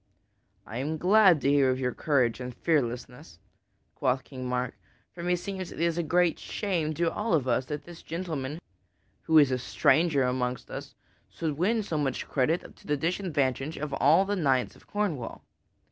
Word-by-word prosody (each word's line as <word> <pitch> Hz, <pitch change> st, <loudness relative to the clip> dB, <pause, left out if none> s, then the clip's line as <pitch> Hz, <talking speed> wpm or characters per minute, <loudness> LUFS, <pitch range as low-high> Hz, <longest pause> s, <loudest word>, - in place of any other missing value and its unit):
"I 115 Hz, -, -6 dB
am 155 Hz, +4 st, -2 dB
glad 185 Hz, -2 st, +5 dB
to 140 Hz, -, +2 dB
hear 140 Hz, -2 st, +4 dB
of 130 Hz, 0 st, 0 dB
your 125 Hz, -2 st, -1 dB
courage 130 Hz, -7 st, +1 dB
and 125 Hz, -1 st, -6 dB
fearlessness," 125 Hz, -, -2 dB, 0.6 s
quoth 130 Hz, 0 st, 0 dB
King 130 Hz, -2 st, -7 dB
Mark, 125 Hz, 0 st, -1 dB, 0.4 s
"for 170 Hz, -, -8 dB
meseems 180 Hz, +1 st, -2 dB
it -, -, -9 dB
is 170 Hz, 0 st, +1 dB
a 170 Hz, -, 0 dB
great 170 Hz, +1 st, +2 dB
shame 170 Hz, -7 st, -2 dB
to 170 Hz, +1 st, +1 dB
all 210 Hz, -4 st, 0 dB
of 135 Hz, -5 st, 0 dB
us 125 Hz, +1 st, +1 dB
that 150 Hz, +1 st, -5 dB
this 170 Hz, +2 st, -12 dB
gentleman, 160 Hz, -3 st, -4 dB, 0.6 s
who 160 Hz, -, +4 dB
is 145 Hz, -3 st, +6 dB
a 130 Hz, -, 0 dB
stranger 155 Hz, +3 st, +3 dB
amongst 125 Hz, -1 st, -2 dB
us, -, -, -7 dB, 0.3 s
should 160 Hz, -3 st, -3 dB
win 210 Hz, +8 st, +1 dB
so 160 Hz, -6 st, -2 dB
much 135 Hz, -3 st, -2 dB
credit 155 Hz, +6 st, 0 dB
to -, -, -18 dB
the 150 Hz, -1 st, +1 dB
disadvantage 155 Hz, -4 st, -1 dB
of 145 Hz, -1 st, -4 dB
all 155 Hz, +8 st, +4 dB
the 205 Hz, +1 st, -1 dB
knights 135 Hz, -8 st, +1 dB
of -, -, -20 dB
Cornwall. 180 Hz, -, -3 dB
150 Hz, 175 wpm, -28 LUFS, 130-170 Hz, 0.6 s, is